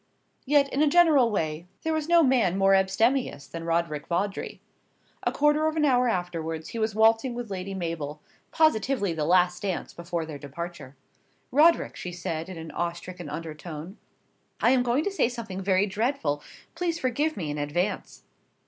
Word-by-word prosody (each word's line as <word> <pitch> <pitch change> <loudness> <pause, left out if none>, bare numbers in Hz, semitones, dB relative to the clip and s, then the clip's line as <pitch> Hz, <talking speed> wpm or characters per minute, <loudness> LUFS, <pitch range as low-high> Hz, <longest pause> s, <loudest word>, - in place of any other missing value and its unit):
Yet, 285 0 +4
in 280 - +1
a 305 - +5
general 295 -6 +5
way, 160 -4 -2 0.2
there 320 - 0
was 315 0 -2
no 340 -1 +6
man 240 - +3
more 195 0 +4
abstemious 195 - +1
than 165 +5 -7
Roderick 165 -3 -1
Vawdrey. 195 +4 -2 0.6
A - - 0
quarter 295 +1 +3
of 315 - -1
an 305 -1 +2
hour 250 -3 +3
afterwards 165 -4 -3
he 230 - -5
was 220 -1 -1
waltzing 225 +3 +3
with 240 -3 -6
Lady 195 +1 -4
Mabel 165 -5 -4 0.3
positively 250 - +2
the 155 -2 -2
last 180 +1 +3
dance 195 -3 -3
before 170 -1 -4
their 155 -3 -8
departure. 145 -1 -8 0.6
"Roderick," 315 +5 +4
she 180 - -6
said 165 -1 -4
in 185 - -7
an 160 -1 -8
awe 170 0 -2
stricken 175 -1 -9
undertone, 160 +3 -7 0.6
"I 240 - +4
am 260 -1 +4
going 245 +4 +1
to 405 - -1
say 385 -11 +1
something 225 -6 -6
very 190 +1 +2
dreadful. 205 - -1 0.3
Please 335 -1 -1
forgive 290 +3 -1
me 160 -6 -3
in 145 - -4
advance." 175 +7 -2
190 Hz, 175 wpm, -26 LUFS, 165-255 Hz, 0.6 s, no